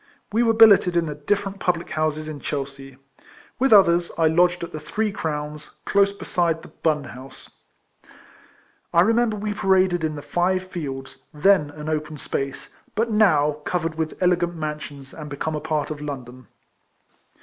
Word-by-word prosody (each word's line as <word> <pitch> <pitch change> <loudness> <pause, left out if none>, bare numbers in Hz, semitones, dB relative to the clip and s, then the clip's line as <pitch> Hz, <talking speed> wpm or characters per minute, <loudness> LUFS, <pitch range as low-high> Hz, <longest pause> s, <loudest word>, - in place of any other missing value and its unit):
We 225 +3 +2
were 230 -1 +3
billeted 200 -5 +6
in 170 - +2
the 150 - -4
different 195 +6 -2
public 175 -2 -1
houses 155 0 -1
in 155 -2 -6
Chelsea. 135 -2 -5 0.6
With 270 0 +2
others, 175 -4 +5
I 160 -1 +4
lodged 175 +2 +2
at 170 - -6
the 155 - -6
Three 210 +8 -2
Crowns, 150 -3 -5
close 200 0 +3
beside 170 -4 -1
the - - -12
Bun 150 -3 -1
House. 130 +1 -12 1.3
I 170 - +5
remember 225 +2 +2
we 210 0 -3
paraded 190 -3 +2
in 155 -1 -1
the 145 - -7
Five 185 +1 0
Fields, 145 -8 -7
then 150 0 +3
an 150 +1 -9
open 155 -1 -3
space, 135 -1 -5 0.2
but 225 +1 0
now 155 -9 +3
covered 170 -1 -1
with 160 -1 -3
elegant 175 -1 +2
mansions, 150 -3 -6
and 150 -2 -8
become 145 +3 -3
a 150 - -3
part 155 -1 -2
of 150 -1 -6
London. 130 -4 -7
160 Hz, 160 wpm, -23 LUFS, 150-185 Hz, 1.3 s, billeted